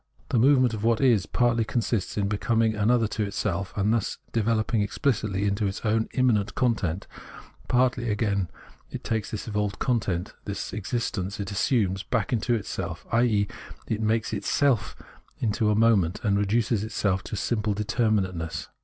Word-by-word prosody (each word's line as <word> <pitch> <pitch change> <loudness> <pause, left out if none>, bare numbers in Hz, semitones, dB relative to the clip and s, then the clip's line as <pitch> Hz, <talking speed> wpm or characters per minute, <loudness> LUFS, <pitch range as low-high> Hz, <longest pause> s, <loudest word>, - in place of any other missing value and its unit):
The 120 - +2
movement 130 -1 +5
of 110 -1 -4
what 115 -1 +3
is 120 -9 +3
partly 120 -2 +2
consists 110 -3 -1
in 100 -1 +1
becoming 110 +2 +1
another 110 +2 +2
to 110 - -3
itself, 100 -2 -2
and 105 +2 +2
thus 115 -3 -1
developing 110 0 +1
exphcitly 105 -3 0
into 100 +1 0
its 95 +4 -5
own 110 +1 +1
immanent 120 -5 +2
content; 100 -8 0 0.6
partly, 125 -1 +2
again, 105 -3 0 0.4
it - - -7
takes 110 -2 -2
this 110 - -5
evolved 105 -2 -1
content, 100 -8 -1
this 100 -1 -4
existence 105 -2 -3
it 100 -1 -4
assumes, 100 -2 +1
back 115 +1 -1
into 120 +1 +1
it 105 - -3
self, - - -5
i.e. 115 -4 +3 0.4
makes 110 +1 0
itself 110 +1 +1 0.4
into 110 -1 +1
a 105 - +3
mom^ent, 105 -5 +3
and 100 -3 +2
reduces 105 +1 +1
itself 100 -3 0
to - - -5
gjmple 105 0 -1
determinateness. 105 -6 -1
110 Hz, 155 wpm, -26 LUFS, 100-115 Hz, 0.6 s, movement